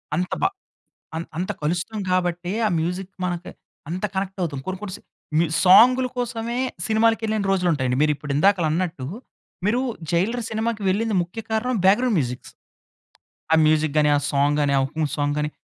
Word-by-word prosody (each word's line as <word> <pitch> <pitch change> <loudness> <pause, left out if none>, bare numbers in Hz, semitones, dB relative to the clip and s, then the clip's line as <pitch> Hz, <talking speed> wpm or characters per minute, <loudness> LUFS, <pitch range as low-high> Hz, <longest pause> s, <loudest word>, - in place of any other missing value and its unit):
అంత 180 +3 -2
బా - - +4 0.7
అం 165 - -2 0.2
అంత 180 - -2
కలుస్తాము 180 +7 -2
కాబట్టే 180 0 0
ఆ - - +3
మ్యూజిక్ 180 +4 -3
మనకు 175 -1 -3 0.4
అంత 180 +4 -4
కనెక్ట్ 195 0 -3
అవుతాం. 145 -6 -2
కొన్ని, 190 0 -3
కొన్ని 195 -2 -5
సా - - -19 0.4
మీ 170 - +4 0.2
సాంగ్‌ల 250 +7 +7
కోసమే 235 -1 -3 0.3
సినిమాలకెళ్ళిన 220 -1 +1
రోజులు 185 -2 +2
ఉంటాయండి. 130 -3 0
మీరు 150 0 +3
ఇప్పుడు 145 -1 -5
ఇందాకల 195 +2 +3
అన్నట్టు 165 -6 -2 0.6
మీరు 235 +4 +2 0.3
'జైలర్' 210 +8 0
సినిమాకి 220 -1 -2
వెళ్ళింది 215 +3 +1
ముఖ్య 180 +6 -7
కారణం 230 +3 0
బ్యాక్‌గ్రౌండ్ 220 +3 +4
మ్యూజిక్స్. 125 -3 -4 1.0
ఆ - - +8
మ్యూజిక్ 155 -1 +2
గాని, 150 -1 +4
ఆ - - +3
సాంగ్ 145 +1 +2
గాని, 140 -1 +1
ఆ - - +3
'హుకుం' 155 +2 -2
సాంగ్ 145 0 0
గాని, 150 0 -1
180 Hz, 165 wpm, -23 LUFS, 155-220 Hz, 1.0 s, ఆ